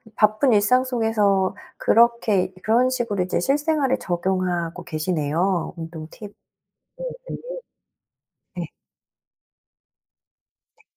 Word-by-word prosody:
바쁜 215 Hz, +4 st, +3 dB
일상 215 Hz, +5 st, +4 dB
속에서 220 Hz, -6 st, +1 dB, 0.2 s
그렇게 230 Hz, -4 st, +3 dB
그런 240 Hz, +4 st, +3 dB
식으로 235 Hz, -7 st, -1 dB
이제 180 Hz, -, -1 dB
실생활에 285 Hz, -1 st, +1 dB
적용하고 180 Hz, -3 st, -2 dB
계시네요, 165 Hz, +2 st, -1 dB
운동 160 Hz, -1 st, -7 dB
팁을 205 Hz, +2 st, -11 dB, 0.9 s
매일. -, -, -5 dB, 1.2 s
네. 175 Hz, -2 st, -4 dB, 2.1 s
네. -, -, -27 dB
205 Hz, 205 characters per minute, -23 LUFS, 175-235 Hz, 2.1 s, 일상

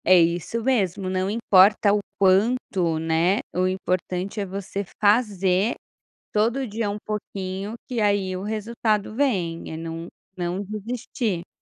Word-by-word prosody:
É 185 Hz, 0 st, +7 dB
isso 175 Hz, +7 st, 0 dB
mesmo, 195 Hz, -7 st, +1 dB
não 185 Hz, +1 st, 0 dB
importa 205 Hz, -1 st, +5 dB
o 210 Hz, -, +3 dB, 0.2 s
quanto, 190 Hz, -3 st, +2 dB
né, 165 Hz, +5 st, +2 dB
o 185 Hz, +1 st, +2 dB
importante 185 Hz, +1 st, -2 dB
é 200 Hz, -, -1 dB
você 195 Hz, +1 st, -4 dB, 0.2 s
fazer 205 Hz, -1 st, +3 dB, 0.6 s
todo 235 Hz, +5 st, +1 dB
dia 220 Hz, 0 st, -2 dB
um 205 Hz, -, -2 dB
pouquinho 200 Hz, -1 st, -4 dB
que 245 Hz, -3 st, -2 dB
aí 200 Hz, -3 st, +1 dB
o 185 Hz, -, -4 dB
resultado 215 Hz, 0 st, -1 dB
vem, 190 Hz, -11 st, 0 dB
é -, -, -4 dB
não 165 Hz, +1 st, -6 dB, 0.3 s
não 175 Hz, +2 st, -2 dB
desistir. 215 Hz, -2 st, -3 dB
200 Hz, 135 wpm, -24 LUFS, 185-215 Hz, 0.6 s, É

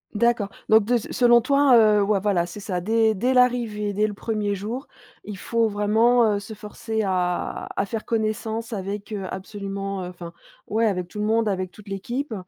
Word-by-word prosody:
D'accord 230 Hz, -2 st, +2 dB, 0.2 s
donc 220 Hz, -1 st, +6 dB
de 245 Hz, +2 st, +2 dB
s 230 Hz, -, -2 dB
selon 240 Hz, -1 st, +5 dB
toi, 275 Hz, +1 st, +4 dB
heu 210 Hz, -2 st, +5 dB
ouais 200 Hz, 0 st, +2 dB
voilà, 185 Hz, -4 st, +1 dB
c'est 205 Hz, -, -9 dB
ça. 185 Hz, -3 st, -3 dB
Dès 220 Hz, +2 st, +2 dB
dès 250 Hz, +6 st, 0 dB
l'arrivée, 230 Hz, -5 st, +2 dB
dès 210 Hz, +2 st, +1 dB
le 205 Hz, -, -6 dB
1er 210 Hz, -2 st, -2 dB
jour, 225 Hz, +8 st, -5 dB, 0.4 s
il 210 Hz, -2 st, -7 dB
faut 230 Hz, +3 st, 0 dB
vraiment, 220 Hz, +4 st, +3 dB
heu, -, -, -1 dB
se 215 Hz, +1 st, -9 dB
forcer 220 Hz, +1 st, -4 dB
à 180 Hz, -2 st, -1 dB
à -, -, +1 dB
faire 220 Hz, +2 st, -5 dB
connaissance 220 Hz, +1 st, -2 dB
avec 200 Hz, +2 st, -5 dB
heu, 195 Hz, -2 st, -4 dB
absolument, 195 Hz, 0 st, -5 dB
heu -, -, -5 dB
enfin, 175 Hz, -1 st, -9 dB, 0.3 s
ouais, 225 Hz, +1 st, +1 dB
avec 180 Hz, -3 st, -1 dB
tout 210 Hz, -, -8 dB
le 210 Hz, -, 0 dB
monde, 225 Hz, 0 st, +2 dB
avec 185 Hz, -2 st, -1 dB
toute 210 Hz, +3 st, -16 dB
l'équipe, 235 Hz, +7 st, -4 dB
210 Hz, 195 wpm, -23 LUFS, 195-230 Hz, 0.4 s, donc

